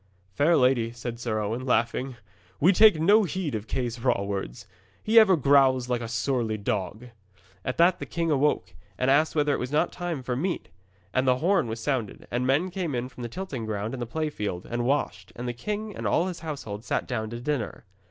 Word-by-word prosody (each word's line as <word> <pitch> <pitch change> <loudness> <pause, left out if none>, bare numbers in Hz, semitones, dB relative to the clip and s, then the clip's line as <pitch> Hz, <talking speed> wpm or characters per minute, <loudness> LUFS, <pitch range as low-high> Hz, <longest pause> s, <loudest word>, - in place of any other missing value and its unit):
'Fair 160 - +3
lady,' 125 -3 +3
said 120 0 -6
Sir 115 -3 -2
Owen, 110 +4 -2
laughing, 125 +1 0 0.4
'we 180 +7 +5
take 210 -3 +6
no 205 +7 +5
heed 185 -5 -2
of 110 0 -4
Kay's 120 -1 -2
raw 120 -4 +1
words. 95 -9 -5 0.4
He 225 +1 +6
ever 205 -4 +6
growls 135 -3 +4
like 120 -1 0
a 115 - -4
surly 115 -1 -1
dog.' 105 +3 -3 0.5
At 130 - -3
that 175 +2 +4
the - - -6
king 165 -1 -1
awoke, 135 - +1 0.2
and 130 +1 +2
asked 155 +4 +3
whether 145 -1 +2
it - - -1
was 125 +2 -4
not 150 - +2
time 175 -6 -4
for 125 0 -2
meat. 175 +7 -2 0.4
And 130 0 +1
the 125 0 +4
horn 175 -1 +2
was 110 +1 -4
sounded, 130 -8 -2
and 125 +1 0
men 155 +8 +2
came 175 -6 -2
in 125 +1 -3
from 125 - -12
the 120 - -4
tilting 135 -8 -5
ground 110 +1 -3
and 130 - -5
the 120 - -3
play 155 +5 -2
field, 100 -8 -4
and 120 0 -2
washed, 140 +3 -1
and 120 +1 -5
the 120 - -2
king 210 - -4
and - - -3
all 170 - +2
his 185 -2 -4
household 135 -10 -6
sat - - -2
down 110 -3 -3
to 120 +1 -6
dinner. 125 -5 -3
130 Hz, 215 wpm, -26 LUFS, 115-155 Hz, 0.5 s, take